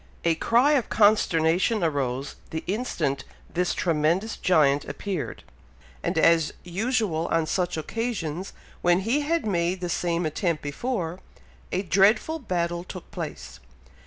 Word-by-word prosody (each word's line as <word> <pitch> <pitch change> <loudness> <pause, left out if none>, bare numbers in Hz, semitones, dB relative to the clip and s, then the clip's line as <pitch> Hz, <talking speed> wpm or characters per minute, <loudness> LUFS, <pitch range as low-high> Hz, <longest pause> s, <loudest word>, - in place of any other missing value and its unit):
A 170 - +3
cry 240 - +3
of 275 -6 +2
consternation 195 -1 +3
arose 140 -4 -1
the 160 - -4
instant 165 - -1 0.3
this 180 +1 0
tremendous 170 +6 +1
giant 145 -5 +3
appeared; 195 -6 -4 0.6
and - - -2
as 165 -2 +4
usual 190 -3 0
on 165 -1 +1
such 180 +1 -1
occasions, 185 -2 -3 0.3
when 175 +1 +3
he 235 +9 +1
had 330 +1 0
made 180 -2 0
the 175 -1 -3
same 170 0 0
attempt 160 +1 -1
before, 175 - -3 0.5
a 185 - 0
dreadful 210 - +3
battle 175 - -2
took 185 0 -10
place. 110 - -7
175 Hz, 130 wpm, -26 LUFS, 160-210 Hz, 0.6 s, as